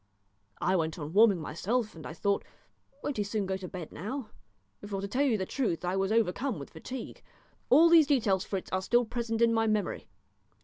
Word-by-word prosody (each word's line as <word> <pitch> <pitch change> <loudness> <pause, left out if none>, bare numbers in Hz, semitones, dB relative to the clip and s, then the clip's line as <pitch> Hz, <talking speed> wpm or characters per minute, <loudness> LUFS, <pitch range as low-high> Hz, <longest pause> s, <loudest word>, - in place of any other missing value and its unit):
I 185 +4 +1
went 160 -2 -1
on 150 0 -6
warming 205 -3 +6
myself, 210 +9 -2
and 160 - -9
I - - -7
thought, 200 +4 0 0.6
'Won't 285 - -2
he 210 - +1
soon 205 0 -2
go 190 0 -1
to 190 -1 -7
bed 180 -4 -7
now?' 220 - -5 0.5
for, 200 -1 -4
to 200 - -3
tell 250 +7 -1
you 265 -6 +3
the 190 - -2
truth, 185 - -2
I 180 +1 0
was 195 +1 0
overcome 230 +2 +1
with 140 - -9
fatigue. 250 +11 -8 0.5
All 310 +6 +7
these 330 -3 +7
details, 215 -10 +2
Fritz, 195 -3 -5
are 185 - 0
still 240 +5 +2
present 230 0 -1
in 230 0 +4
my 225 0 +2
memory. 215 -1 -1
205 Hz, 205 wpm, -30 LUFS, 185-235 Hz, 0.6 s, All